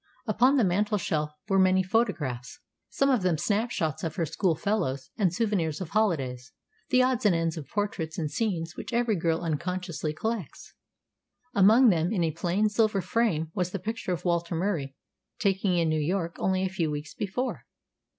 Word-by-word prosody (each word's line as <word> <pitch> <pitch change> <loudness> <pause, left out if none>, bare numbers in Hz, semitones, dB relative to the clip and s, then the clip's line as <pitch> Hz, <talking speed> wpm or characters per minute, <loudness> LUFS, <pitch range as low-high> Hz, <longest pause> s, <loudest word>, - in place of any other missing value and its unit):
Upon 245 +5 +3
the 250 - +4
mantelshelf 185 -5 0 0.2
were 195 -2 +3
many 185 0 +4
photographs, 170 - -1 0.3
some 275 0 +2
of 250 -6 +2
them 180 -3 +1
snap 215 +8 0
shots 160 -6 -2
of 160 -2 -3
her 170 - 0
schoolfellows 165 -5 -1
and 190 -5 +2
souvenirs 175 -6 0
of 185 -4 -5
holidays, 135 - 0 0.4
the 255 0 +5
odds 255 -1 +1
and 205 -5 +4
ends 165 -1 0
of 155 -4 -7
portraits 200 -6 -3
and 155 -3 -2
scenes 175 -7 -2
which - - -7
every 235 -2 +2
girl 165 -2 0
unconsciously 170 0 -2
collects. 215 - -5 0.8
Among 225 +4 +6
them, 170 -1 +2
in 190 -6 +1
a 160 - +1
plain 180 +6 0
silver 210 -1 +2
frame, 180 -4 0
was 180 -2 -1
the 200 - -3
picture 215 +1 -4
of 175 - -3
Walter 170 0 0
Murie 165 -7 -2 0.4
taken 195 -4 +1
in 170 -2 +2
New 155 -1 +1
York 170 +2 -1
only 190 0 +1
a 190 - 0
few 175 -4 -1
weeks 150 0 -5
before. 245 +6 -3
185 Hz, 175 wpm, -27 LUFS, 160-210 Hz, 0.8 s, Among